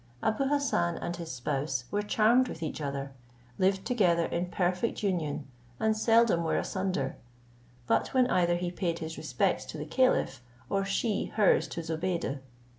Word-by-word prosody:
Abou 220 +5 +1
Hassan 270 -12 +1
and 175 - -3
his 170 -2 -6
spouse 135 +1 -2
were 205 - +1
charmed 225 +5 +3
with 165 - -6
each 155 0 -4
other, 140 -1 -3 0.5
lived 190 +1 +2
together 180 -9 +3
in 175 +2 -2
perfect 180 +5 -1
union, 160 -7 -1 0.3
and 220 0 +2
seldom 225 -5 +4
were 160 - +1
asunder, 185 -8 -2 0.7
but - - +2
when 255 -1 +3
either 175 -7 +2
he 175 0 -2
paid 175 -2 -2
his 160 -1 -5
respects 135 -6 0
to - - -7
the 150 - -5
caliph, 165 - +2 0.3
or 195 0 +1
she 200 +2 0
hers 210 -3 +3
to 170 - -5
Zobeide. 160 -3 -2
175 Hz, 160 wpm, -29 LUFS, 160-215 Hz, 0.7 s, seldom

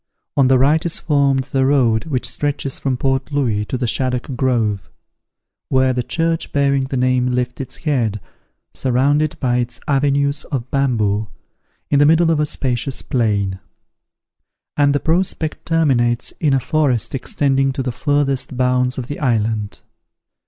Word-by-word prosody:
On 135 -2 +4
the 130 0 +5
right 145 +5 +3
is 170 - -2
formed 140 -3 +1
the 135 0 -1
road 125 -5 +2
which 135 -6 -1
stretches 145 -2 -3
from 130 -2 -1
Port 135 +2 -1
Louis 115 -8 0
to 130 - -3
the 125 - -2
Shaddock 125 +2 -2
Grove, 110 - 0 0.8
where 130 0 +3
the 125 - -1
church 165 +5 -1
bearing 140 -1 +1
that 130 0 -3
name 125 0 +2
lifts 125 +1 -2
its 130 -1 -7
head, 115 -8 0 0.5
surrounded 140 +4 +1
by 125 -2 +1
its 120 -1 -3
avenues 140 0 +1
of 130 -3 -4
bamboo, 110 -6 +1 0.6
in 140 - +4
the 145 - +5
middle 165 +1 +4
of 155 - +1
a 150 - +1
spacious 130 -1 -2
plain; 100 -6 0 1.2
and 145 -1 +3
the - - +2
prospect 165 -1 -1
terminates 130 -8 +1
in 145 -4 +2
a - - +2
forest 135 -5 0
extending 135 0 0
to 135 0 -3
the 125 - -2
furthest 135 0 -1
bounds 125 0 +1
of 130 - -3
the 145 +3 -6
island. 110 -5 -1
130 Hz, 155 wpm, -19 LUFS, 125-145 Hz, 1.2 s, the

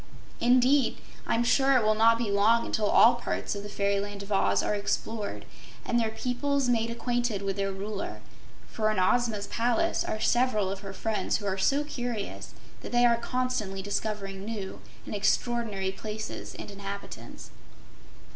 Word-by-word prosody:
Indeed, 255 +3 +4 0.3
I'm 230 - +2
sure 270 +3 +4
it 240 - +2
will 215 0 +4
not 225 +1 +5
be 230 -3 -1
long 220 +4 +4
until 215 -2 0
all 235 - +7
parts 240 - -3
of 200 - -5
the 205 - -8
fairyland 200 0 -1
of 200 - -11
Oz 100 - +2
are - - 0
explored 210 +1 -3 0.4
and 240 - +1
their 225 -1 +1
peoples 255 +4 -1
made 230 -2 +1
acquainted 235 -3 -1
with 195 -1 -1
their 195 -1 -1
Ruler, 200 +1 -5 0.5
for 215 -1 0
in 215 - 0
Ozma's 210 +2 +2
palace 245 +9 +1
are 215 - -3
several 220 -5 +2
of 195 - -4
her 195 -1 -7
friends 215 +2 -1
who 205 - -8
are 195 -1 -1
so 280 +9 +2
curious 245 -7 -5 0.3
that - - -8
they 245 0 +4
are 235 -1 +5
constantly 235 -6 -2
discovering 200 -1 -3
new 205 -3 -5 0.2
and - - -6
extraordinary 210 -2 0
places 215 +2 -6
and - - -8
inhabitants. 200 0 -8
215 Hz, 165 wpm, -28 LUFS, 200-240 Hz, 0.5 s, all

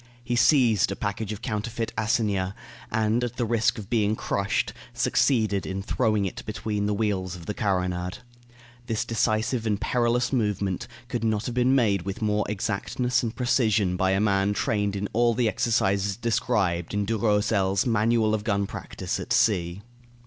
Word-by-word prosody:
He 120 0 -1
seized 120 - +4
a - - -2
package 100 +1 -3
of 105 +2 -7
counterfeit 115 0 -3
assignats, 105 -3 0 0.4
and, 110 +2 +1
at 120 0 -3
the 120 - -1
risk 115 +1 +1
of 105 -3 -7
being 110 -2 +1
crushed, 100 0 -1 0.2
succeeded 110 -4 +2
in 95 +1 -4
throwing 110 -2 +1
it 95 - -5
between 105 -1 -2
the 105 - 0
wheels 95 -4 -1
of 85 -2 -10
the 105 - -3
carronade. 90 -2 -1 0.7
This 110 -2 -1
decisive 115 +1 0
and 105 -2 0
perilous 120 +2 +1
movement 100 -6 -1 0.2
could 120 -2 -3
not 110 -1 0
have 120 - -3
been 125 +2 +3
made 105 -7 +2
with 95 +2 -5
more 105 -1 0
exactness 105 +4 -1
and 115 -1 -3
precision 110 -7 +2
by 95 +1 +1
a 95 0 +2
man 100 -1 +2
trained 105 -2 0
in 100 +1 -2
all 120 0 +3
the 120 -1 +2
exercises 100 -2 +1
described 105 -7 0
in 105 0 0
Durosel's 105 -2 +1
"Manual 115 -1 +2
of 105 -1 -1
Gun 100 -2 0
Practice - - -5
at - - -7
Sea." 90 -2 +2
105 Hz, 165 wpm, -26 LUFS, 100-115 Hz, 0.7 s, seized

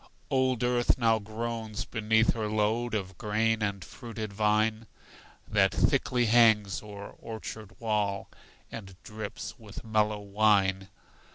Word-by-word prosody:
Old 130 -3 +2
earth 120 0 +2
now 115 -3 +3
groans 110 +1 -4
beneath 110 0 +2
her 110 -2 -2
load 110 +2 0
Of 95 -3 -4
grain 110 +1 +1
and 100 -3 -2
fruited 110 -3 -7
vine, 110 +1 +1 0.6
That - - +3
thickly 125 -1 +2
hangs 110 -5 +4
o'er 100 -1 -9
orchard 110 -1 -8
wall, 105 -3 -1 0.4
And 95 -4 -8
drips 110 +2 -7
with 105 +1 -10
mellow 105 -1 +1
wine. 100 -2 +2
110 Hz, 120 wpm, -29 LUFS, 105-115 Hz, 0.6 s, hangs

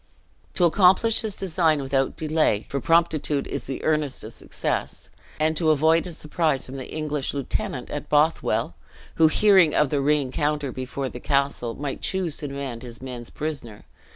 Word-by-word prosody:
To 180 - +4
accomplish 190 +6 +4
his 215 -3 -3
design 165 -4 +1
without 135 0 -1
delay 155 -9 +1
for 140 - -2
promptitude 160 -3 +2
is - - -5
the 135 - -5
earnest 150 -4 0
of - - -8
success - - -4 0.3
and 155 +1 +2
to 160 -2 +2
avoid 160 +3 +3
a - - -6
surprise 155 -3 -1
from 135 +1 -7
the 130 - -8
English 150 -3 -3
lieutenant 140 -2 -3
at - - -5
Bothwell 150 +2 +2 0.4
(who, 160 - +6
hearing 190 -2 +5
of 150 -3 +2
the 145 -2 +1
reencounter 145 0 0
before 130 +1 -4
the 125 - -8
castle, 140 -4 0
might 140 -1 -5
choose 185 -5 -1
to 145 - -4
demand 135 -4 -5
his 120 -2 -9
men's 125 -2 -7
prisoner). 140 -9 -6
150 Hz, 165 wpm, -24 LUFS, 135-160 Hz, 0.4 s, who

